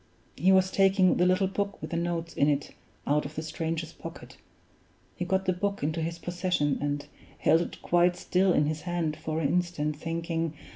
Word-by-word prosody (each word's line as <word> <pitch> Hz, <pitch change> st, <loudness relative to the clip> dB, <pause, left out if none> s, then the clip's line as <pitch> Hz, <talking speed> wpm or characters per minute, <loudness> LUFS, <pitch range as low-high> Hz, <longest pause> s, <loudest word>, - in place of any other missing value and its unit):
He 185 Hz, +7 st, +3 dB
was 190 Hz, 0 st, +4 dB
taking 195 Hz, -1 st, +4 dB
the 180 Hz, -, +4 dB
little 185 Hz, +1 st, +3 dB
book 200 Hz, +1 st, -2 dB
with 155 Hz, -, -7 dB
the -, -, -1 dB
notes 170 Hz, -1 st, -2 dB
in 145 Hz, -, +3 dB
it 145 Hz, -1 st, -1 dB, 0.3 s
out 150 Hz, +1 st, +2 dB
of 150 Hz, +2 st, -8 dB
the 155 Hz, -, -3 dB
stranger's 160 Hz, 0 st, -3 dB
pocket. -, -, -10 dB, 0.8 s
He 175 Hz, -, -3 dB
got 190 Hz, +1 st, 0 dB
the 185 Hz, -, +2 dB
book 200 Hz, +1 st, -2 dB
into 155 Hz, +2 st, -1 dB
his 165 Hz, +1 st, -3 dB
possession, 175 Hz, -5 st, -1 dB
and 145 Hz, 0 st, -2 dB, 0.3 s
held 160 Hz, +2 st, +4 dB
it -, -, -6 dB
quite 175 Hz, +1 st, +3 dB
still 185 Hz, +1 st, +2 dB
in 150 Hz, -, +3 dB
his 155 Hz, +1 st, -2 dB
hand 175 Hz, -3 st, -1 dB
for 155 Hz, +1 st, -3 dB
an 145 Hz, -4 st, +1 dB
instant, 170 Hz, -3 st, 0 dB
thinking. 165 Hz, 0 st, -2 dB
170 Hz, 195 wpm, -28 LUFS, 155-180 Hz, 0.8 s, was